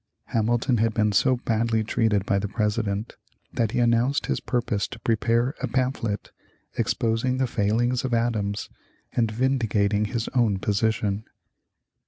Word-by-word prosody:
Hamilton 120 +2 +2
had 110 0 +1
been 105 -1 +2
so 130 +5 +3
badly 115 -1 0
treated 110 -3 +1
by 100 -1 +1
the 105 - -2
President 105 0 -1 0.4
that 115 -2 +1
he - - -1
announced 120 +3 +2
his - - -1
purpose 115 -5 -1
to - - -10
prepare 115 +3 +1
a - - 0
pamphlet, 125 -5 -2 0.4
exposing 115 +3 0
the 130 - +2
failings 120 +2 +1
of 130 - -2
Adams 110 -4 0 0.5
and 115 -2 +1
vindicating 110 -4 +1
his 115 0 -3
own 115 -6 +2
position. 105 0 0
115 Hz, 140 wpm, -25 LUFS, 105-120 Hz, 0.5 s, so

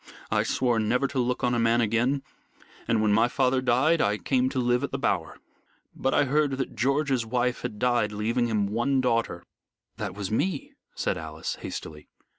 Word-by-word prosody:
I - - +3
swore 120 -3 +1
never 125 +5 +1
to 135 - -2
look 125 0 -1
on 125 - +2
a 120 - +1
man 115 +1 +3
again, 120 +5 +1 0.6
and 115 -2 +2
when 105 -1 +3
my 115 +3 +4
father 130 +1 +1
died 135 +6 +3
I 105 +1 +2
came 130 +2 +1
to 130 - -5
live 125 +1 +2
at 140 - -1
The 135 - -3
Bower. 85 -11 -1 0.6
But 135 - 0
I - - +3
heard 145 +1 +1
that 135 - -3
George's 135 -2 +1
wife 125 +2 -1
had 105 - -5
died, 120 -2 +1
leaving 115 +3 0
him 105 -3 +1
one 120 +7 +1
daughter 115 -8 0 0.3
" - - -54
"That 100 -4 -4
was 100 -1 -4
me," 145 - -1 0.2
said - - -1
Alice, 80 0 -5
hastily. 75 -1 -7
120 Hz, 195 wpm, -26 LUFS, 110-130 Hz, 0.6 s, my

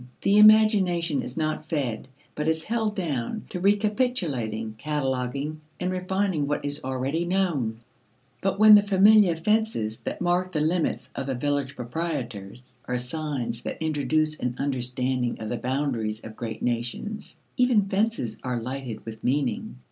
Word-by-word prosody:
The 200 +1 +5
imagination 200 -7 +5
is 125 - -5
not 155 -1 -2
fed, 130 -8 -2 0.3
but 150 +1 -3
is 160 0 +2
held 220 -1 -1
down 165 - -3
to 180 - -4
recapitulating, 190 - 0
cataloguing, 140 +1 -2 0.2
and 180 +1 -1
refining 185 -4 0
what 145 0 -1
is 145 0 -3
already 130 +5 -1
known. 170 -12 0 0.6
But 195 0 0
when 215 +1 +9
the 205 - +9
familiar 200 -2 +5
fences 165 - 0
that 115 - -5
mark 180 +1 0
the 155 - 0
limits 165 +2 0
of 135 - -4
the 135 - -1
village 140 +1 -1
proprietors 125 - -5
are 125 - -1
signs 125 -3 -3
that - - -5
introduce 155 0 0
an 125 -1 -2
understanding 125 -2 -1
of 110 - -5
the 120 - -2
boundaries 120 -4 -2
of 110 - -9
great 110 -2 -5
nations, 125 - -3 0.2
even 250 -5 +3
fences 195 - -1
are 125 -2 -1
lighted 125 -2 -5
with 110 -1 -8
meaning. 130 - -1
150 Hz, 150 wpm, -26 LUFS, 125-185 Hz, 0.6 s, when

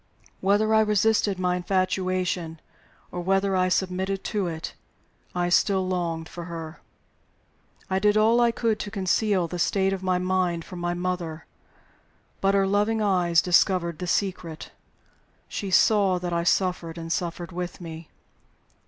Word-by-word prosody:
Whether 205 +3 +2
I 220 - +6
resisted 210 -1 +2
my 180 -1 0
infatuation, 185 -2 -1 0.5
or 175 - -4
whether 195 +2 +1
I 185 0 +2
submitted 190 +1 -1
to 205 -4 -1
it, 160 -1 -5 0.6
I 175 0 0
still 190 +1 +2
longed 170 -3 -2
for 175 0 -8
her. 165 -1 -7 1.1
I 190 0 0
did 210 +1 +3
all 225 +3 +4
I 240 - +5
could 230 -2 0
to 205 - -4
conceal 195 -2 +1
the 175 +1 -5
state 195 +2 +1
of 190 - -4
my 185 -1 +1
mind 180 -2 0
from 180 - -8
my 175 0 -1
mother. 175 -3 -3 1.0
But 195 +1 +3
her 195 -1 +3
loving 205 +3 +1
eyes 180 -5 +3
discovered 175 -2 +2
the 180 - -4
secret: 175 -4 -2 0.8
she 200 - -4
saw 195 0 +4
that 175 -1 -4
I 170 0 0
suffered, 175 -2 0
and 165 0 -3
suffered 170 0 -4
with 180 +1 -5
me. 165 -2 -9
185 Hz, 150 wpm, -25 LUFS, 175-195 Hz, 1.1 s, I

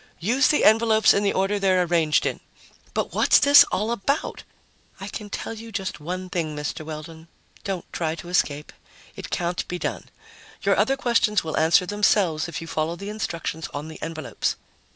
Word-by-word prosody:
Use 240 +10 +2
the 300 - +2
envelopes 220 0 +5
in 200 - +1
the 200 -1 +2
order 195 +2 0
they're 185 -2 +3
arranged 165 -3 +2
in." - - -2 0.6
"But - - -2
what's - - +5
this 285 0 +8
all 215 +4 -1
about?" 275 +7 -2 0.6
"I 195 - -6
can 205 0 -7
tell 215 - -5
you 225 0 -10
just 195 -2 -4
one 180 +4 -5
thing, 165 -5 -3
Mr. 150 +1 -4
Weldon 160 +1 -9 0.4
don't 190 -3 -4
try 160 -2 -2
to 170 +1 -10
escape. 150 -4 -1 0.4
It - - -8
can't 175 0 -2
be 180 - -4
done. - - -4 0.5
Your - - +3
other 270 +1 +2
questions 230 -5 +2
will 160 -1 -4
answer 160 +4 +4
themselves 190 -5 +1
if 170 - -6
you 165 - -8
follow 160 +1 -2
the 200 +3 -7
instructions 170 -6 -4
on 150 +2 -5
the 160 - -11
envelopes." 160 -1 -3
180 Hz, 180 wpm, -24 LUFS, 160-210 Hz, 0.6 s, this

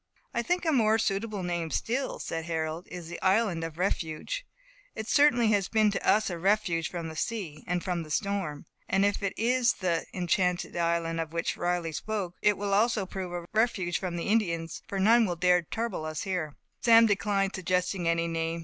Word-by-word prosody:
"I 235 - +1
think 355 +7 -1
a 320 - +3
more 220 -5 +4
suitable 210 -1 -1
name 175 -2 -2
still," 255 - -1
said 165 -1 -4
Harold, 160 0 -3
"is 175 -2 -7
the 170 - -7
Island 190 -3 +2
of 165 -1 -6
Refuge. 185 - -2 0.5
It - - -3
has - - -9
certainly 240 -7 +5 0.2
been 215 -2 +4
to - - -3
us 215 -2 +3
a 170 - -4
refuge 185 -3 +1
from 170 -2 -5
the 160 - -7
sea, 170 -4 -4
and 180 0 -1
from 180 -2 -1
the 155 - -9
storm. 190 -4 -2 0.2
And 195 +1 +3
if 205 +1 0
it 200 -1 -1
is 245 +2 +3
the 175 -3 -1
Enchanted 180 0 0
Island, 170 -1 0
of 160 0 -4
which 170 0 -1
Riley 175 -1 -1
spoke, 195 +1 -3
it 210 -1 +3
will 200 0 -2
also 215 0 +2
prove 185 -1 -5
a 175 -1 -5
refuge 215 -6 +1
from 180 -2 -3
the 170 - -3
Indians, 170 -7 0
for 195 - -3
none 225 +3 +5
will 175 - -2
dare 180 +1 +3
to 165 - -24
trouble 225 -8 -3
us 155 0 -4
here." 180 -7 -3 0.3
Sam 230 -1 +7
declined 200 -2 +1
suggesting 180 -1 -1
any 170 0 +1
name. 165 0 -2
185 Hz, 200 wpm, -28 LUFS, 170-215 Hz, 0.5 s, Sam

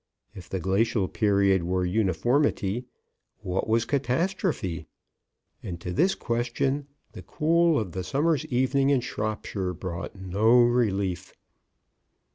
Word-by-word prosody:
IF 90 -3 -11
THE 95 - -2
GLACIAL 95 +2 +1
PERIOD 100 -3 +2
WERE 90 +2 -1
UNIFORMITY, 110 - +1 0.6
WHAT 90 +3 -2
WAS 115 +1 +2
CATASTROPHE?... 140 - -1 0.7
AND 85 -2 -6
TO 90 +1 -5
THIS 190 - +2
QUESTION, 125 +4 -1 0.2
THE - - -10
COOL 165 +1 +2
OF 100 -6 -4
THE 95 - -4
SUMMER'S 145 - 0
EVENING 130 +2 +1
IN 135 -3 +3
SHROPSHIRE 105 -5 -3
BROUGHT 85 +1 -6
NO 100 +6 +3
RELIEF." 100 -7 0
110 Hz, 115 wpm, -26 LUFS, 95-135 Hz, 0.7 s, IN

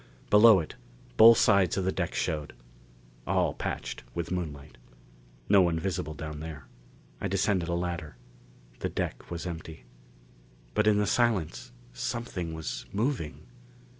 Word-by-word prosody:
Below 105 -1 +8
it, 80 - -6 0.4
both 115 - +9
sides 100 -5 +4
of 95 - 0
the 95 - +2
deck - - -3
showed. 75 -2 -2 0.7
All - - +2
patched - - -4
with 85 0 -3
moonlight. 75 -7 -5 0.7
No 100 -1 +6
one 85 -2 +2
visible 80 -3 -3
down 75 0 -6
there. 75 -3 -8 0.6
I - - -1
descended 95 -2 0
a 85 - 0
ladder. 85 -3 -4 0.6
The - - -2
deck - - -4
was 85 -1 -5
empty. 80 -5 -7 0.9
But 105 0 +2
in 105 -1 +5
the 105 - +2
silence 105 - 0 0.2
something 90 - -4
was 80 -7 -5
moving! 110 - -2
85 Hz, 135 wpm, -28 LUFS, 80-100 Hz, 0.9 s, both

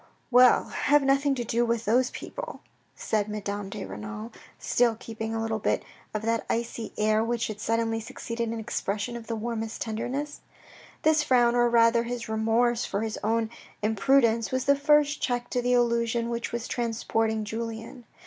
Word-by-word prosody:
" - - -39
Well, 250 0 +6
have 295 0 +3
nothing 275 +1 +3
to 245 - -2
do 235 +1 +1
with 230 -1 0
those 250 +4 +3
people," - - -7 0.3
said 215 -1 -1
Madame 205 -1 -4
de - - -6
Renal, 105 +3 -7 0.3
still 235 -2 +2
keeping 225 0 -5
a - - -1
little 225 -1 -2 0.5
of 215 - -1
that 230 0 0
icy 230 -1 -2
air 215 +1 +2
which 235 0 -1
had 215 -1 -5
suddenly 225 0 0
succeeded 230 +1 -4
an 230 0 -3
expression 215 0 -3
of 230 -1 -8
the 230 - -2
warmest 225 0 -4
tenderness. 245 +7 -3 0.6
This 315 -1 +4
frown, 245 -5 +3
or 240 0 +4
rather 230 0 +5
his 235 0 -4
remorse 225 +2 +1
for 200 - -2
his 220 -1 -3
own 225 +1 +1 0.3
imprudence, 230 +1 +3
was 260 0 -1
the 280 - +5
first 295 +1 +3
check 245 -1 -1
to 245 - +1
the 245 +1 +1
illusion 235 -1 +1
which 235 0 -3
was 235 0 -3
transporting' 225 -2 -1
Julien. 225 +2 -6
230 Hz, 170 wpm, -27 LUFS, 220-245 Hz, 0.6 s, Well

